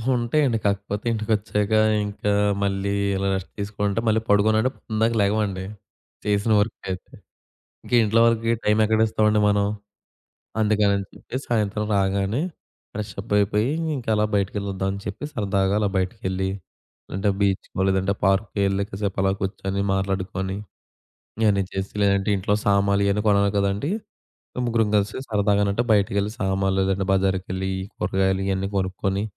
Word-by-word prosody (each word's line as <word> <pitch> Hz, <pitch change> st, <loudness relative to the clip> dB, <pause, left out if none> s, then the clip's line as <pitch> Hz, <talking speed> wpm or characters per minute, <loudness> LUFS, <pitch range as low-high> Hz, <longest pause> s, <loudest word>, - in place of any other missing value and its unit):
ఉంటాయండి. 120 Hz, +1 st, +1 dB
కాకపోతే 100 Hz, +1 st, -1 dB
ఇంటికొచ్చాక 110 Hz, -1 st, 0 dB, 0.3 s
ఇంకా 105 Hz, 0 st, -2 dB, 0.3 s
మళ్ళీ 100 Hz, 0 st, 0 dB, 0.2 s
ఇలా 95 Hz, 0 st, -1 dB
రెస్ట్ 95 Hz, -1 st, -5 dB
తీసుకుంటే 100 Hz, +1 st, -1 dB
మళ్ళీ 110 Hz, 0 st, +3 dB
పడుకోనుంటే 110 Hz, +4 st, +4 dB, 0.2 s
ఇందాక 110 Hz, +2 st, +2 dB
లెగవండి. 100 Hz, -2 st, 0 dB, 0.6 s
చేసిన 105 Hz, +1 st, +1 dB
వర్క్ 105 Hz, +3 st, -1 dB
అయితే. 95 Hz, 0 st, -6 dB, 0.7 s
ఇంకా -, -, -3 dB
ఇంట్లో 110 Hz, +1 st, +3 dB
వలకి 115 Hz, 0 st, +2 dB
టైం 105 Hz, +1 st, +3 dB
ఎక్కడిస్తామండి 110 Hz, -1 st, +2 dB
మనం. 100 Hz, 0 st, +2 dB, 0.9 s
అందుకనని 105 Hz, -2 st, +2 dB
చెప్పే -, -, -7 dB
సాయంత్రం 105 Hz, -2 st, 0 dB
రాగానే 100 Hz, +5 st, +1 dB, 0.5 s
ఫ్రెష్ 105 Hz, -1 st, -5 dB
అప్ 105 Hz, +2 st, -7 dB
అయిపోయి 105 Hz, +4 st, +1 dB, 0.3 s
ఇంకా 120 Hz, -4 st, -4 dB
అలా 105 Hz, 0 st, +2 dB
బయటకెళ్ళొదమని 100 Hz, -1 st, -1 dB
చెప్పి 100 Hz, +7 st, -5 dB
సరదాగా 100 Hz, -2 st, 0 dB
అలా 105 Hz, -, +2 dB
బయటికెళ్ళి 95 Hz, 0 st, -1 dB, 0.6 s
లేదంటే 95 Hz, +2 st, 0 dB
బీచ్‌కో 95 Hz, -1 st, 0 dB
లేదంటే 95 Hz, 0 st, +1 dB
పార్క్‌కో 95 Hz, +1 st, +1 dB
ఎళ్లి, 95 Hz, +1 st, 0 dB
కాసేపలా 95 Hz, -1 st, -1 dB
కూర్చొని 95 Hz, 0 st, -2 dB
మాట్లాడుకొని 95 Hz, 0 st, -2 dB, 0.9 s
ఇయన్నీ 100 Hz, -3 st, +3 dB
చేసి 95 Hz, 0 st, -4 dB
లేదంటే 100 Hz, 0 st, +2 dB
ఇంట్లో 100 Hz, +2 st, 0 dB
సామాన్లు 100 Hz, 0 st, +3 dB
ఇయన్నీ 100 Hz, +1 st, +1 dB
కొనాలి 100 Hz, -1 st, +4 dB
కదండీ. 100 Hz, +8 st, 0 dB, 0.8 s
ముగ్గురం 115 Hz, -2 st, +1 dB
కలిసి 105 Hz, +1 st, 0 dB
సరదాగానంటే 100 Hz, 0 st, +2 dB
బయటికెళ్ళి 100 Hz, 0 st, +2 dB
సామాన్లుగాని 95 Hz, 0 st, +1 dB
లేదంటే 95 Hz, 0 st, +1 dB
బజారుకెళ్ళి 95 Hz, 0 st, 0 dB, 0.3 s
కూరగాయలు 95 Hz, +1 st, 0 dB
ఇయన్నీ 95 Hz, 0 st, -1 dB
కొనుక్కొని, 95 Hz, +1 st, -1 dB
100 Hz, 125 wpm, -23 LUFS, 95-105 Hz, 0.9 s, పడుకోనుంటే